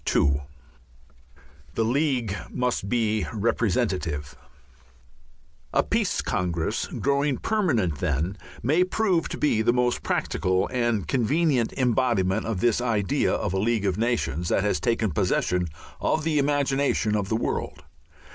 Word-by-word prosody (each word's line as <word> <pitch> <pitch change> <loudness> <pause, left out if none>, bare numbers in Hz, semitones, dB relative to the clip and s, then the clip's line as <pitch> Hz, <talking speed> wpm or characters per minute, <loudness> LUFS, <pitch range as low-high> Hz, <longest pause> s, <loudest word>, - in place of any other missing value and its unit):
II 70 0 +3 1.3
THE 115 - +1
LEAGUE 125 -5 0
MUST 125 -5 -1
BE 110 -2 +1
REPRESENTATIVE 95 - -1 1.4
A - - +4
Peace - - 0
Congress, 85 -3 -1
growing 140 0 0
permanent, 120 - 0
then, 80 +3 -1 0.3
may 155 +10 +3
prove 185 -3 0
to - - -5
be 130 -7 +2
the 115 - +3
most 125 0 +1
practical 95 0 0
and 120 -5 0
convenient 135 0 +1
embodiment 120 -6 +1
of 110 -5 -2
this 120 0 +2
idea 105 -6 +1
of 90 - -1
a 95 - 0
League 110 0 +1
of 95 0 0
Nations 90 - 0
that 100 - +2
has 105 - +1
taken 115 -4 0
possession 90 +4 0 0.3
of 155 - 0
the 155 -2 +1
imagination 140 -5 +1
of 100 -2 -1
the 110 - +1
world. - - -3
115 Hz, 130 wpm, -25 LUFS, 95-130 Hz, 1.4 s, A